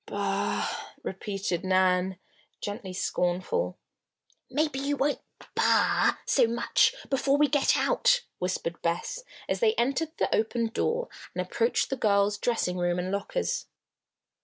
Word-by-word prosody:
"Bah!" - - -1 0.4
repeated 190 -2 -3
Nan, 185 0 +2 0.4
gently 205 -2 -5
scornful. 185 - -1 0.7
"Maybe 300 -3 0
you 285 +1 -1
won't 285 +2 0 0.3
'bah' - - +3
so 250 -4 +4
much 235 +1 +2 0.2
before 275 +1 +2
we 295 0 +5
get 285 0 +3
out," - - +3 0.2
whispered 180 -2 -2
Bess, 175 - -2 0.2
as - - -1
they 450 -2 +3
entered 285 +6 0
the - - 0
open 225 +1 +1
door 475 - -1 0.3
and - - -1
approached 465 - 0
the 270 - -1
girls' 205 -1 +2
dressing 215 -7 0
room 175 0 +1
and 180 +1 -2
lockers. 485 - -2
230 Hz, 130 wpm, -28 LUFS, 185-295 Hz, 0.7 s, we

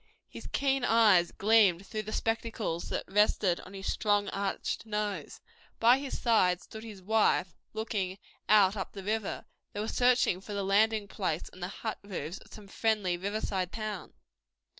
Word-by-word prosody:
His - - -10
keen 270 -2 0
eyes 210 -7 +5
gleamed 200 -3 +4
through 215 - -4
the 215 0 -7
spectacles 225 -6 -2
that - - -2
rested 195 -3 +2
on 195 - -11
his 195 0 -7
strong, 205 -1 +1
arched 200 +3 -3
nose. 210 -1 -3 0.4
By 240 +3 +6
his 275 -1 -5
side 185 -7 +3
stood 220 +3 -10
his 210 -5 -10
wife, 210 -3 +2 0.2
looking 210 -4 -2 0.3
out 205 -2 +6
up 195 - -5
the 195 - -8
river. 215 +1 -2 0.3
They 205 - -5
were 215 - -2
searching 245 -8 +2
for 205 - -8
the 200 -1 -2
landing 210 +2 +2
place 180 -5 -3
and 185 - -13
the 180 - -2
hut 220 +3 -5
roofs 180 -3 -5
of - - -19
some 210 -2 -12
friendly 205 -3 0
river 200 +4 -3
side 185 -2 -2
town. 215 -1 -5
205 Hz, 170 wpm, -30 LUFS, 190-220 Hz, 0.4 s, By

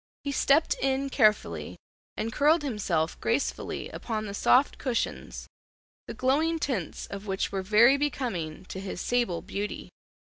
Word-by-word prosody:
He 285 - -2
stepped 280 +3 +3
in 270 +1 0
carefully 215 -3 +1 0.4
and 225 +1 -3
curled 300 +2 +4
himself 190 - -1
gracefully 240 +5 -1
upon 215 -2 -4
the 200 - -5
soft 255 +6 +3
cushions, 255 -5 -3 0.6
the - - -6
glowing 305 +6 +2
tints 250 - -3
of 200 +1 -8
which 190 0 -1
were 195 -1 -2
very 220 +8 +5
becoming 225 - -3
to 190 - -7
his 190 -1 -5
sable 195 -9 0
beauty. 200 +2 -5
230 Hz, 140 wpm, -28 LUFS, 195-275 Hz, 0.6 s, very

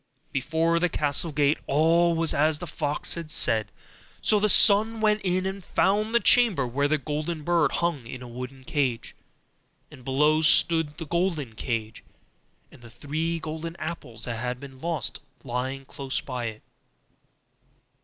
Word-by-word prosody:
Before 160 +5 0
the 180 +1 +1
castle 150 +2 +1
gate 145 0 +2
all 165 +4 +3
was 165 -1 +2
as 155 +1 +2
the 175 - -7
fox 150 -4 -1
had 170 -2 -5
said: 110 -7 +1 0.5
so 210 - +3
the 210 +1 +2
son 220 +3 +5
went 215 -1 +2
in 185 0 0
and 190 0 -4
found 210 +6 +1
the - - +6
chamber 230 - +4
where 140 +4 0
the 155 +1 +1
golden 150 +2 -4
bird 170 +1 +2
hung 165 -8 -1
in 125 +1 -8
a - - -9
wooden 125 +2 -8
cage, 130 -4 -2 0.8
and 130 - -14
below 150 +4 +2
stood 160 -1 +3
the 165 - -6
golden 160 -6 -1
cage, 110 -1 -4 0.7
and - - -17
the 120 - -13
three 160 +7 -3
golden 160 +1 -6
apples 145 -9 -6
that 115 -2 -4
had 125 +1 -3
been 135 -1 -12
lost 165 -2 -1 0.2
were 130 - -10
lying 130 +2 -3
close 135 0 -4
by 125 -3 -5
it. 110 -1 -6
150 Hz, 165 wpm, -26 LUFS, 130-170 Hz, 0.8 s, the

